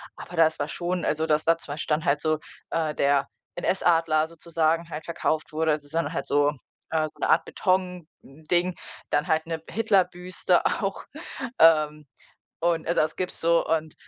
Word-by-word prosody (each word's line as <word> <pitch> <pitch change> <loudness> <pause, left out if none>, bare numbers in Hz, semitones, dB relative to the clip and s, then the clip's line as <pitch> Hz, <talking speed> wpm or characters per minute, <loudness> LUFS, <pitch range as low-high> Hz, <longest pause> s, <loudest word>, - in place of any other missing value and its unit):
aber 175 - -10
das 160 -1 +4
war 145 - -1
schon, 175 +2 -2
also, 155 +1 0
dass 155 -1 +2
da 165 0 +4
2 145 -3 -7
Stand 155 0 -1
halt 145 +1 +2
so 155 -1 +1 0.3
äh, 160 -2 -1
der 140 -1 +2 0.3
NS-Adler 165 -4 +2
sozusagen 165 0 -1
halt 155 -1 -6
verkauft 160 -2 -2
wurde, 160 0 +1
also, 150 -1 -5
so 160 +3 -3
’n 165 - -1
halt 140 - -3
so 145 0 +3 0.4
äh, 160 -1 +1
so - - -26
’ne - - -1
Art 165 - +4
Betonding, 180 -2 -2 0.3
dann 145 - +1
halt 160 0 +1
’ne 165 -1 -4
Hitlerbüste 185 -4 +1
auch, 195 -1 -1 0.5
ähm, 150 -2 +5 0.6
und, 165 -1 0
also, 170 - +2
das 155 - -2
gibt's 185 - -3
so, 170 0 +3
und, 160 -1 -1
160 Hz, 170 wpm, -25 LUFS, 155-175 Hz, 0.6 s, ähm